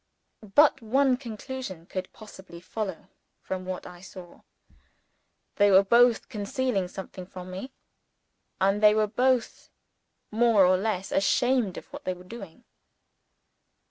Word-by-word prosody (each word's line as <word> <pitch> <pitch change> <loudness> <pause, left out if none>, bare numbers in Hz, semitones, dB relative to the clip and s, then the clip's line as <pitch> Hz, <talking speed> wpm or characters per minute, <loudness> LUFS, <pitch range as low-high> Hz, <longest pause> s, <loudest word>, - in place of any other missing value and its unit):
But 290 -2 +5
one 260 +4 +2
conclusion 240 -6 -7
could 185 +1 -6
possibly 190 -5 -13
follow 190 0 -6 0.3
from 185 -1 -5
what 185 0 -5
I 175 -1 -11
saw: 180 -2 -12 1.2
they 205 -1 +5
were 195 0 +6
both 235 +3 +4
concealing 210 -1 -2
something 185 0 -9
from 185 -1 -9
me; 195 +9 -7 0.9
and 195 +2 +2
they 210 0 +6
were 215 0 +3
both 250 +3 0 0.6
more 220 -3 +4
or 185 +1 +4
less 190 -1 -2
ashamed 245 -1 +1
of - - -8
what - - -8
they 185 - -2
were 180 - -14
doing. 195 0 -11
200 Hz, 130 wpm, -27 LUFS, 185-240 Hz, 1.2 s, were